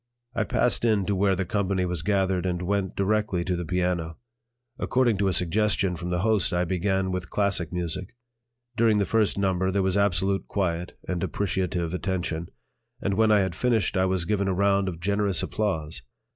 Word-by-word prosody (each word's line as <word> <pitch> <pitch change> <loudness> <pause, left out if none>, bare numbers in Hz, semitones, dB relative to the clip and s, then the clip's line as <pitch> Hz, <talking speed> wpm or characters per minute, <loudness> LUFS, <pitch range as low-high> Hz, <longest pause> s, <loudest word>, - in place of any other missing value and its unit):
I 110 -3 0
passed 120 +3 +1
in 110 -4 +2
to 100 - 0
where 95 0 +2
the 95 +1 -2
company 95 -1 0
was 90 -3 -3
gathered 95 -1 +1
and 90 0 -2
went 100 0 -1
directly 100 -3 0
to 90 - 0
the 90 - -3
piano. 90 -2 -1 0.6
According 120 -5 +2
to 100 - +2
a - - +2
suggestion 95 +1 +1
from 90 +1 -5
the 90 0 0
host, 110 -2 +2
I 90 0 +1
began 95 +1 0
with 90 -1 -4
classic 100 -5 0
music. 90 +3 -4 0.6
During 115 -2 +3
the 100 - +2
first 110 -2 +1
number 95 -1 +1
there 95 0 +1
was 95 +1 +1
absolute 95 0 +1
quiet 90 -3 -2
and 90 -2 -2
appreciative 90 -2 -1
attention, 90 -3 -2 0.5
and 100 - -1
when 110 +2 +3
I 105 -1 +5
had 95 -2 -1
finished, 115 +2 +1
I 95 0 +3
was 95 -2 0
given 100 +1 0
a 95 - 0
round 100 0 +2
of 85 -3 -4
generous 100 +1 +1
applause. 80 -8 -2
95 Hz, 185 wpm, -26 LUFS, 90-100 Hz, 0.6 s, I